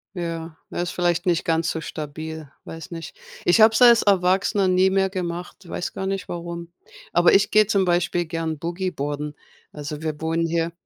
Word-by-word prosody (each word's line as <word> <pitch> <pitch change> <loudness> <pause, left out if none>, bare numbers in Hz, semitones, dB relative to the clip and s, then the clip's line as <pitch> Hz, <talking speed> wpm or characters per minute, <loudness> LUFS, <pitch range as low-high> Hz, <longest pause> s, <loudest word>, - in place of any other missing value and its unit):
Ja, 165 -2 -5 0.2
äh, - - -2
ist 175 - -3
vielleicht 175 0 0
nicht 175 -3 +2
ganz 165 0 +1
so 160 - -4
stabil, 155 0 -6 0.2
weiß 165 +1 -9
nicht. 165 -2 -7 0.3
Ich 175 +6 +4
habe 220 0 +7
es 250 - +1
als 235 -1 +7
Erwachsener 195 +1 +2
nie 185 +1 +4
mehr 190 0 +2
gemacht, 175 -1 -5
weiß 175 - -4
gar 190 - -4
nicht 195 -1 -3
warum. 170 0 -6 0.4
Aber 175 +1 +5
ich 195 - +4
gehe 215 0 +6
zum 200 -3 +2
Beispiel 175 0 +1
gern 160 -2 -3
Boogieboarden. 150 -4 -3 0.4
Also, 150 +1 -6
wir 155 -1 -4
wohnen 165 +1 0
hier 165 0 -1
170 Hz, 180 wpm, -23 LUFS, 160-185 Hz, 0.4 s, habe